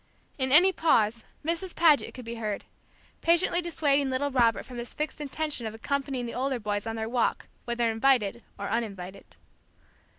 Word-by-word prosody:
In 260 0 +1
any 355 +7 +7
pause, 230 -10 +2 0.2
Mrs. 340 +3 -2
Paget 320 -4 +4
could 250 -2 -9
be 230 - -5
heard, 210 -2 -3 0.6
patiently 340 +1 +3
dissuading 290 -5 +1
little 270 +2 -1
Robert 235 -3 +2
from 250 -2 -8
his 240 - -6
fixed 300 0 -3
intention 295 -4 -3
of 220 - -6
accompanying 270 +1 -2
the 235 - -5
older 260 0 -1
boys 205 0 -2
on 225 - -3
their 220 0 -3
walk, 240 0 0 0.2
whether 235 -1 0
invited 235 -2 +2 0.2
or - - -4
uninvited. 200 -4 -4
255 Hz, 165 wpm, -28 LUFS, 225-290 Hz, 0.6 s, any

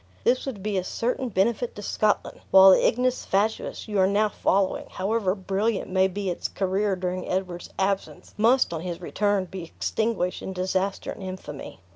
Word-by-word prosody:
This 255 +2 +2
would 210 -8 -5
be 205 -2 0
a - - -3
certain 245 +6 -2
benefit 230 +4 0
to 205 - -8
Scotland; 210 +1 0
while 190 0 +9
the - - +5
ignis 250 +2 +1
fatuus 210 +4 -1
you 210 -2 -1
are 190 - +5
now 210 +2 +2
following, 195 -1 0
however 195 0 0
brilliant 195 +2 -1
may 190 0 +4
be 195 0 -3
its 175 - -3
career 195 +1 0
during 185 0 -3
Edward's 180 -2 -3
absence, 195 0 -2
must 235 -1 +3
on 160 - -3
his 175 -1 -5
return 205 +1 0
be 185 0 -7
extinguished 200 +2 -2
in 190 - -5
disaster 190 +1 -1
and - - -9
infamy." 185 - -8
195 Hz, 175 wpm, -25 LUFS, 185-215 Hz, -, while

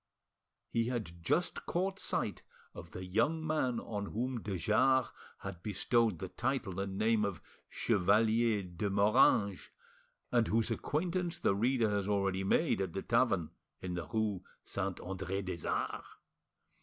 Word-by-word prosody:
He 115 0 +1
had 105 -9 -4
just 165 - 0
caught 190 +2 -1
sight - - -2 0.3
of 85 - -9
the 90 +2 -7
young 130 - +1
man 130 -6 0
on 100 -2 -4
whom 120 +2 -2
de 100 -3 -3
Jars 130 +8 +3 0.3
had 95 -3 -6
bestowed 110 +1 +1
the 95 - -5
title 115 -4 -2
and 100 -1 -3
name 110 0 +3
of 100 -4 -2 0.3
Chevalier 110 +1 +2
de 90 +3 -3
Moranges, 100 -1 +3 0.6
and 120 -2 +3
whose 115 +2 +1
acquaintance 175 +7 -1
the 100 - +2
reader 115 +1 +2
has 100 -1 -1
already 95 -2 +1
made 100 - +2
at 95 -4 -2
the 95 - -3
tavern 115 -9 +2 0.3
in 90 -1 -4
the 85 -1 -4
rue 110 -4 -1 0.2
Saint 100 -2 -3
Andre 95 +1 -3
des 90 -2 -5
Arts. - - -2
105 Hz, 145 wpm, -33 LUFS, 95-120 Hz, 0.6 s, Jars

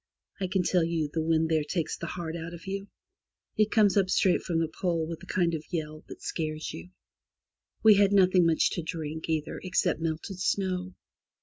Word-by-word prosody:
I 190 - -1
can 185 0 +1
tell 175 0 +2
you, 165 -3 -1
the 160 - 0
wind 160 0 +2
there 160 -2 +2
takes 160 +1 -2
the 170 - -6
heart 165 -1 -5
out 165 0 -6
of 165 - -13
you. 195 +1 -4 0.7
It 215 0 +3
comes 210 -3 +4
up 195 -2 +3
straight 185 -1 +3
from 170 - -2
the 165 0 +1
Pole, 165 0 -1
with 165 0 -6
a 185 - -12
kind 175 -2 +1
of 155 -2 -3
yell 155 -3 -4
which - - -10
scares 155 -1 -3
you. 85 +2 -9 0.9
We 220 - +9
had 200 0 +4
nothing 185 -3 +5
much 160 -1 +3
to 175 - -2
drink, 160 -1 -5
either, 155 -1 -1
except 180 -3 +1
melted 165 +4 -3
snow. 185 -1 -1
170 Hz, 200 wpm, -28 LUFS, 160-185 Hz, 0.9 s, We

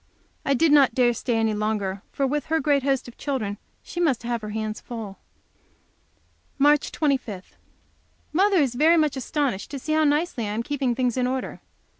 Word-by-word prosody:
I 275 - +2
did 320 +3 +3
not 275 -5 +5
dare 250 -2 +4
to - - -2
stay 235 0 -1
any 225 -1 +1
longer, 210 -2 -2
for, 275 - 0
with 295 +3 -1
her 320 +1 +1
great 285 -1 +2
host 270 -1 0
of 240 - -13
children, 220 -8 -3 0.2
she 345 - -7
must 280 -9 +1
have 235 -1 -2
her 215 - -6
hands 215 0 -4
full. 220 -5 -7 1.4
March 290 +1 +3
25. 255 - -2 0.8
Mother 390 +4 +3
is 275 -7 +2
very 315 +7 +4
much 305 -3 +2
astonished 265 -5 -2
to 280 - -5
see 310 +4 -3
how 315 0 +3
nicely 295 -5 +1
I 205 - -3
am 225 +2 -2
keeping 270 -3 -1
things 250 -1 0
in 250 -1 +1
order. 260 0 -4
260 Hz, 190 wpm, -24 LUFS, 225-295 Hz, 1.4 s, not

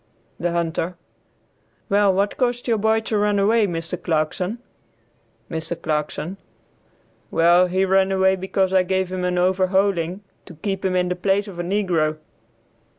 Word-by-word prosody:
The 175 0 -1
Hunter. 170 +1 -2 0.9
"Well, 200 0 +3
what 200 +2 0
caused 245 -1 -1
your 225 -2 +2
boy 220 +1 +2
to 220 -1 -1
run 205 0 +2
away, 210 +2 +3
Mr. 170 0 -4
Clarkson?" 175 +6 -1 0.9
Mr. 160 +1 -4
Clarkson. 155 +3 -3 0.9
"Well 175 +2 +4
he 185 +2 +1
ran 190 0 +3
away 190 0 +3
because 190 0 -1
I 190 - +5
gave 190 0 -1
him 185 -1 -3
an 180 0 0
overhauling, 185 0 +1 0.3
to 175 - -11
keep 195 +4 -4
him 185 -1 0
in 180 0 +1
the 180 - -1
place 195 +3 0
of 185 -3 -9
a - - -1
negro." 175 -5 0
185 Hz, 150 wpm, -22 LUFS, 175-200 Hz, 0.9 s, I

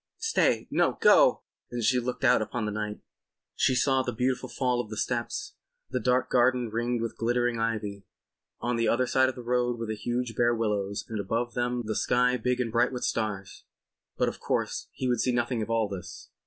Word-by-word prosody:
Stay. 450 0 +1
No—go!" - - +4 0.3
And 120 -1 -4
she 125 +4 +3
looked 125 +1 -4
out - - +5
upon 110 +1 -3
the 105 - -2
night. 105 0 -4 0.5
She 130 - +2
saw 135 +1 +3
the 125 - -2
beautiful 125 +2 -1
fall 125 -2 0
of 110 - -10
the 110 - -6
steps, 130 - -2 0.4
the - - 0
dark 125 0 +1
garden 125 -2 +3
ringed 120 +1 -1
with 115 - -5
glittering 120 0 +1
ivy, 105 -3 -3 0.5
on 120 0 -1
the 115 - +1
other 125 +2 +2
side 130 +1 +3
of 130 - -6
the 125 - -8
road 120 0 0
the 110 - -2
huge 120 +2 -3
bare 120 0 +3
willows 105 -3 -1
and 110 -2 -4
above 115 +4 -2
them 120 0 -1
the 110 - -2
sky 125 +3 +2
big 125 +1 -1
and 120 -3 -1
bright 120 +3 +2
with 125 -1 -5
stars. 105 -4 -3 0.5
But - - +2
of - - -4
course - - -2
he 130 - -3
would 120 -2 +1
see 130 - +1
nothing 120 -1 0
of 110 - -4
all 115 -2 +1
this. 95 -3 -8
120 Hz, 200 wpm, -28 LUFS, 110-125 Hz, 0.5 s, out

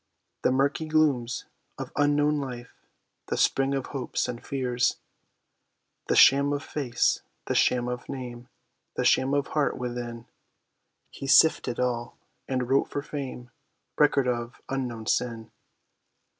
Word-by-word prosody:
The - - +2
murky 140 +4 +1
glooms 145 -7 +1 0.3
of - - -6
unknown 145 0 +2
life, 125 -3 -6 0.5
the - - -2
spring 135 +1 +2
of 135 - -2
hopes, 130 -2 -2
and 120 -1 -6
fears, 125 -2 0 1.1
The - - +2
sham 140 +2 +6
of 145 - -3
face, 125 -5 0 0.2
the - - -1
sham 125 -1 +2
of 125 0 -5
name, 125 -2 -7 0.5
the - - -1
sham 135 +2 +3
of 140 -1 0
heart 150 -2 0
within; 120 -1 -5 0.9
He 135 - -7
sifted 135 -4 +4
all, 120 -1 -2 0.3
and 130 -2 -1
wrote 135 +2 +2
for 145 - -3
fame, 130 -5 -6 0.4
record 145 -3 +3
of 120 -1 -3
unknown 125 -5 -3
sin. 115 -1 -1
130 Hz, 130 wpm, -27 LUFS, 120-140 Hz, 1.1 s, sham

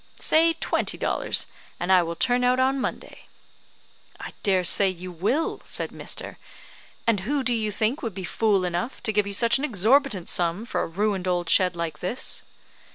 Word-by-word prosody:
"Say 330 +1 +4
twenty 325 - -2
dollars, - - 0 0.3
and 175 +2 -1
I 185 -1 +6
will 170 0 -3
turn 245 +5 +1
out 250 +1 +3
on 265 +1 +2
Monday." - - -6 0.9
"I - - -7
dare 190 -3 +2
say 195 +2 +6
you 185 0 -7
will," 205 - -1
said - - -4
Mr., - - -5 0.7
"and 230 -3 +2
who 270 +8 -1
do 250 - +1
you 215 -2 -1
think 220 +6 -1
would 225 -6 -4
be 190 - -5
fool 200 +1 +1
enough 180 +8 -3
to 220 -3 -1
give 205 -1 +2
you 200 - -4
such 235 +5 +3
an - - -4
exorbitant 235 - +2
sum 175 +5 0
for - - -2
a - - -2
ruined 195 +1 -1
old 175 -2 -1
shed 185 -2 +3
like 165 -3 -4
this?" 225 +8 -4
205 Hz, 185 wpm, -25 LUFS, 180-250 Hz, 0.9 s, I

